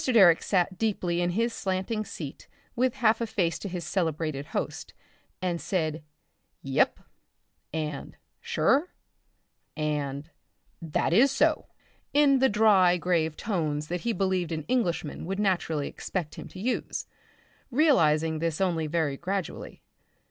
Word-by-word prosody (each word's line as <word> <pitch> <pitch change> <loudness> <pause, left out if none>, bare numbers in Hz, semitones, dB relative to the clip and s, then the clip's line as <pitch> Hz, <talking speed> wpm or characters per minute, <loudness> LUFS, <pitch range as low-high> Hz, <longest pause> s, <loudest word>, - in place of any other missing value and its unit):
Direck 195 -10 +6
sat 185 -1 0
deeply 180 -6 0
in 175 - +1
his 230 +6 0
slanting 195 +3 -2
seat 145 -8 -8 0.3
with 255 0 +1
a - - -16
half 220 -2 +4
face 170 -6 0
to 200 - -5
his 175 -1 -4
celebrated 160 -5 -1
host - - -4 0.5
and 175 -2 -1
said 160 -4 -1 0.6
"Yep" 135 -1 +1 0.7
and 150 -2 -4 0.2
"Sure" 300 +7 +1 0.8
and 150 -1 -2 0.5
"That 165 0 0
is 245 +9 +6
so," 300 +3 +2 0.5
in 285 -2 +5
the 265 0 +4
dry 200 -4 +5
grave 165 -3 0
tones 155 -8 -2
that 175 0 -2
he 235 - 0
believed 185 -5 0
an 160 -1 -3
Englishman 175 - -1
would 195 +1 -2
naturally 175 -7 0
expect 175 -5 -4
him - - -8
to 185 - -11
use, 245 +6 -2 0.6
realising 165 - +3
this 165 -1 -1
only 170 -5 +1
very 150 -3 0
gradually. 190 +1 -4
175 Hz, 135 wpm, -27 LUFS, 160-215 Hz, 0.8 s, Direck